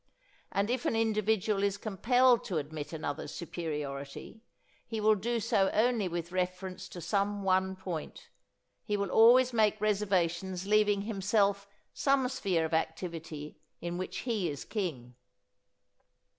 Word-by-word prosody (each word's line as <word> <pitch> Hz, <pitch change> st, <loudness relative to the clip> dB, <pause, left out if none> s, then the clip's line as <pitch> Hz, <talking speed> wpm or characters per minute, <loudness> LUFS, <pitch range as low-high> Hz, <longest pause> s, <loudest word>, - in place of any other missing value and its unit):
And 200 Hz, +3 st, 0 dB
if 250 Hz, -1 st, -1 dB
an -, -, +1 dB
individual 215 Hz, -2 st, +1 dB
is 200 Hz, 0 st, +1 dB
compelled 240 Hz, +5 st, +3 dB
to 180 Hz, -, -2 dB
admit 150 Hz, 0 st, -5 dB
another's 155 Hz, -1 st, -4 dB
superiority, 150 Hz, +1 st, -5 dB, 0.5 s
he 225 Hz, -, -3 dB
will 215 Hz, +1 st, +5 dB
do 230 Hz, +4 st, -1 dB
so 205 Hz, -3 st, +2 dB
only 225 Hz, -2 st, +2 dB
with 170 Hz, 0 st, -4 dB
reference 185 Hz, 0 st, -3 dB
to 175 Hz, -, -8 dB
some 200 Hz, +2 st, 0 dB
one 190 Hz, 0 st, +2 dB
point. 180 Hz, -4 st, -6 dB, 0.5 s
He 210 Hz, -1 st, -1 dB
will 200 Hz, -2 st, -2 dB
always 245 Hz, +3 st, +6 dB
make 215 Hz, -2 st, +3 dB
reservations 190 Hz, -3 st, 0 dB
leaving 205 Hz, -1 st, +3 dB
himself 200 Hz, -1 st, +1 dB, 0.3 s
some 275 Hz, -2 st, +2 dB
sphere 185 Hz, -10 st, 0 dB
of 160 Hz, -, -5 dB
activity 160 Hz, -2 st, -3 dB, 0.2 s
in 175 Hz, +1 st, -4 dB
which 185 Hz, -, -4 dB
he 215 Hz, -8 st, 0 dB
is 145 Hz, -2 st, -6 dB
king. 160 Hz, -, -4 dB
195 Hz, 135 wpm, -31 LUFS, 170-215 Hz, 0.5 s, always